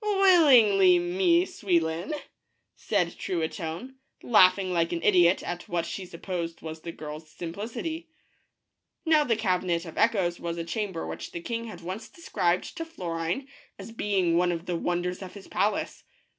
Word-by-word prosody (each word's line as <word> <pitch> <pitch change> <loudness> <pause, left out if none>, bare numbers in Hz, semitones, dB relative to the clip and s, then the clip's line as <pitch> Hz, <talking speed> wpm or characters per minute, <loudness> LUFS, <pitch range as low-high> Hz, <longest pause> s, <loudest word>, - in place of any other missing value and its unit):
"Willingly, 275 - +6
Mie 175 0 +2
Souillon," 170 - -1 0.6
said 180 -5 -1
Truitonne, 170 +8 -4 0.3
laughing 185 -4 +5
like 165 -1 +1
an 170 -1 -3
idiot 180 -3 +4
at 175 0 -6
what 170 -1 -1
she 190 -2 -6
supposed 170 -1 -5
was 160 0 -7
the 170 - -6
girl's 155 0 -8
simplicity. 225 - -5 1.0
Now 310 -2 +5
the 235 -5 +1
Cabinet 180 -5 0
of 165 - -7
Echoes 190 -6 +2
was 170 0 -4
a 170 - -2
chamber 185 0 -3
which - - -7
the 170 - -4
king 230 +6 -4
had 210 -6 -9
once 185 +6 -6
described 180 - -1
to 330 - -2
Florine 175 - -3 0.3
as - - -9
being 195 -6 +1
one 175 0 +3
of 170 0 -4
the 180 - -2
wonders 175 +2 -2
of 185 0 -9
his 200 - -11
palace. 205 0 -1
180 Hz, 155 wpm, -27 LUFS, 170-215 Hz, 1.0 s, Willingly